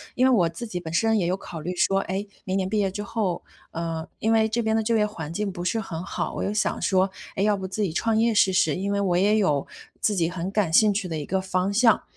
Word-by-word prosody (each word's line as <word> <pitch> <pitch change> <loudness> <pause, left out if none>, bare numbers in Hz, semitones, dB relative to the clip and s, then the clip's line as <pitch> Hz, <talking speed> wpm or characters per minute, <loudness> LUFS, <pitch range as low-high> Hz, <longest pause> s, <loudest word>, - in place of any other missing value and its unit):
因 255 - +3
为 260 - +5
我 175 -8 +4
自 200 +9 -7
己 180 -5 -4
本 165 -2 -7
身 225 +5 +3
也 180 - +1
有 180 - +1
考 165 -4 -8
虑 180 +3 -4
说， 195 +2 +2
诶， 195 +2 -3 0.2
明 190 -2 -1
年 190 - 0
毕 215 - 0
业 195 -2 +1
之 205 - -5
后， 210 -5 -2 0.3
呃， 165 -1 -4
因 220 - +1
为 220 -1 +4
这 230 +2 -1
边 220 0 +1
的 225 - +1
就 230 +1 +1
业 210 - +3
环 160 -7 -6
境 205 +2 -2
不 175 -1 -6
是 225 +5 0
很 170 -5 -5
好。 - - -3
我 - - -2
就 200 - -1
想 210 - 0
说， 190 0 +2 0.3
诶， 195 - 0
要 210 -1 +3
不 190 - -5
自 190 +3 -4
己 195 -6 0
创 225 +6 0
业 230 +1 +3
试 200 -2 +4
试， 160 -5 +2
因 195 +2 -2
为 200 - +1
我 180 -3 +1
也 205 +4 +3
有 150 -10 +1 0.3
自 210 - +1
己 170 -3 +1
很 180 +1 -4
感 200 -5 +1
兴 210 +4 +5
趣 195 -2 -2
的 160 - -3
一 150 - -4
个 190 0 -1
方 185 +1 -1
向。 230 +1 +4
195 Hz, 305 characters per minute, -25 LUFS, 180-215 Hz, 0.3 s, 为